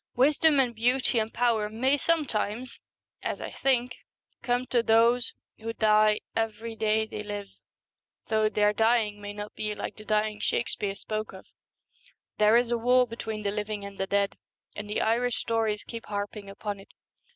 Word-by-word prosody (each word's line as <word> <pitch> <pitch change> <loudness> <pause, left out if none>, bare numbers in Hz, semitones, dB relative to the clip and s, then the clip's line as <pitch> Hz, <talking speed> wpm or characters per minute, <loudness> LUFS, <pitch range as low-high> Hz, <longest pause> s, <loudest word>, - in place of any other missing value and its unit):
Wisdom 290 +3 +4
and 250 -3 +2
beauty 245 +1 +2
and 220 0 -2
power 230 -3 +1
may 255 +6 +2
sometimes, 255 -7 -1 0.4
as - - -3
I - - -6
think, 250 -2 0 0.4
come 245 +1 0
to 240 - +4
those 230 +2 +3 0.2
who 225 +1 -4
die 215 -1 +4
every 225 0 -2
day 220 0 +1
they 220 - -6
live, 205 -1 -5 0.8
though 215 -1 +2
their 210 0 +2
dying 220 -1 +2
may 205 0 -5
not 205 0 -7
be 210 -1 -3
like - - -5
the 215 - -10
dying 215 0 0
Shakespeare 210 -2 -1
spoke 215 +1 -4
of. 190 - -11 0.9
There 215 +2 +6
is 240 0 +1
a 235 - +1
war 250 +2 +4
between 220 -2 -5
the 200 - 0
living 210 -1 -3
and 200 0 -10
the 195 - -1
dead, 200 0 0 0.4
and 210 0 -6
the 210 - 0
Irish 240 +2 +1
stories 225 -2 0
keep 230 -1 -8
harping 205 0 -4
upon 200 0 -5
it. 195 - -15
220 Hz, 170 wpm, -28 LUFS, 210-240 Hz, 0.9 s, There